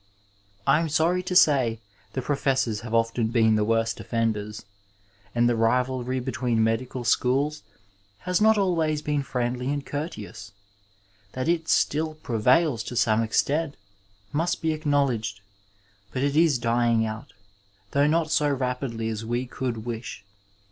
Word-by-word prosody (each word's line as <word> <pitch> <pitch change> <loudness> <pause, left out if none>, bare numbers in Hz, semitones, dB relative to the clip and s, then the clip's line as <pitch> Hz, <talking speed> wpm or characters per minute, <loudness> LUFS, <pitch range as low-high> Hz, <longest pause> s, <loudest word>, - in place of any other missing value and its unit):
I - - +4
am 165 -1 -1
sorry 165 +4 +2
to 180 0 -4
say 130 - +4 0.3
the 130 - -3
professors 130 -6 0
have 115 -1 -8
often 115 0 +1
been 110 -1 +3
the 105 -1 +2
worst 115 +1 0
offenders, 110 -3 -2 0.7
and 120 0 +3
the 120 - +2
rivalry 125 +2 0
between 125 -3 0
medical 120 +3 -1
schools 135 +5 +1 0.6
has 180 +2 0
not 220 +1 +6
alwajrs 165 -6 +1
been 150 -1 0
friendly 125 -1 -2
and 145 -1 -3
courteous. 105 - -6 0.8
That 130 0 -3
it 165 -1 0
still 155 +1 +1
prevails 125 +1 +2
to 125 - -6
some 110 -1 +3
extent 145 +7 0 0.6
must 165 +4 0
be 160 -1 +2
acknowledged, 140 -9 0 0.7
but 130 - -2
it 140 0 0
is 160 -3 +4
dying 115 -1 +2
out, 110 +6 -7 0.6
though 140 +1 +3
not 160 0 +1
so 150 -2 +2
rapidly 125 -4 -2
as 110 0 -3
we 120 +3 -2
could 120 -3 -4
wish. 115 -3 -6
125 Hz, 140 wpm, -25 LUFS, 115-150 Hz, 0.8 s, not